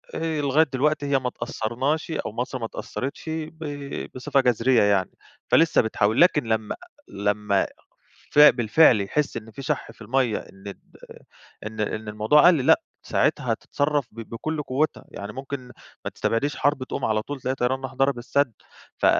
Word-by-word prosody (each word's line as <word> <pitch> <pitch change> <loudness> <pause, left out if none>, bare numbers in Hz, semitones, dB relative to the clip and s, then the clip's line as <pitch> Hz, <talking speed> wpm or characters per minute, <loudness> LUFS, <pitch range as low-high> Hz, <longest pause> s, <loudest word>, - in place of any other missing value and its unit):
آآ 160 -2 -1
لغاية 145 +2 +4
دلوقتي 145 +2 +1
هي 140 -1 +2
ما 130 - -3
اتأثرناش، 130 +9 -2
أو - - -3
مصر 125 +3 -4
ما 115 - -3
اتأثرِتش 130 +4 -6
ب 160 0 -5 0.5
بصفة 130 +2 +1
جذرية 125 0 +3
يعني، 100 -2 +2 0.4
فلسه 165 0 +5
بتحاول. 110 +2 +1
لكن 165 -5 +5
لما 110 -1 -1 0.3
لما 100 0 0 0.6
ف 150 - +3
بالفعل 120 -3 +6
يحس 145 +9 -1
إن 110 0 -9
في 135 - -9
شَح - - -3
في - - -21
المَيَّة، 120 0 +1
إن 95 +1 -10 0.9
إن 110 0 -9
إن 110 +1 -3
الموضوع 110 +10 +4
قل، 160 -8 +4
لأ - - +5 0.2
ساعتها - - +1
هتتصرف 145 -2 -1
ب 115 - -12
بكل 150 +6 -3
قوِّتها، 145 +4 -1
يعني 100 +1 -7
ممكن 135 +1 -5 0.5
ما - - -3
تستبعديش 140 +6 -1
حرب 145 -2 +1
تقوم 130 - -4
على 110 -1 +1
طول، 140 +3 -7
تلاقي 130 +2 -1
طيران 130 +2 0
راح 130 0 -6
ضرب 135 -1 +2
السد 125 +1 0 0.4
ف - - -1
130 Hz, 165 wpm, -24 LUFS, 110-145 Hz, 0.9 s, بالفعل